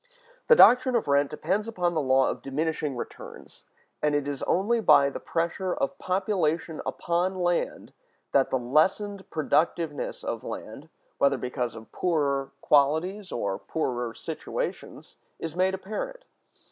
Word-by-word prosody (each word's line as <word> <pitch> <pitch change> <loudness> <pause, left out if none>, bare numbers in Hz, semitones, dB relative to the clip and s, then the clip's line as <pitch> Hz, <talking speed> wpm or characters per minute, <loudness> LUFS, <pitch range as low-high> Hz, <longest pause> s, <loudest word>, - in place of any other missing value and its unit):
The 475 - +8
doctrine 250 - +7
of 230 - +1
rent 140 0 +3
depends 190 +8 -1
upon 180 -6 -1
the 160 - +1
law 130 -1 +3
of - - -3
diminishing 150 0 -2
returns; - - -9 0.4
and 150 -1 +2
it 145 -1 0
is 140 -2 -4
only 215 +6 +2
by 140 -10 +5
the - - -6
pressure 170 +2 -2
of 135 - -2
population 180 -4 -1
upon 175 +2 -1
land 175 -1 -1 0.4
that 135 -1 +3
the 130 - +1
lessened 190 - +1
productiveness 155 0 -1
of - - -4
land, - - -8 0.3
whether 140 0 +3
because 125 -1 -3
of 110 0 -12
poorer 140 -5 0
qualities 160 +7 +2
or 100 -4 -2
poorer 120 -7 -3
situations, - - -6 0.2
is 165 -1 -6
made 185 +1 +2
apparent. - - -6
160 Hz, 140 wpm, -27 LUFS, 140-190 Hz, 0.4 s, The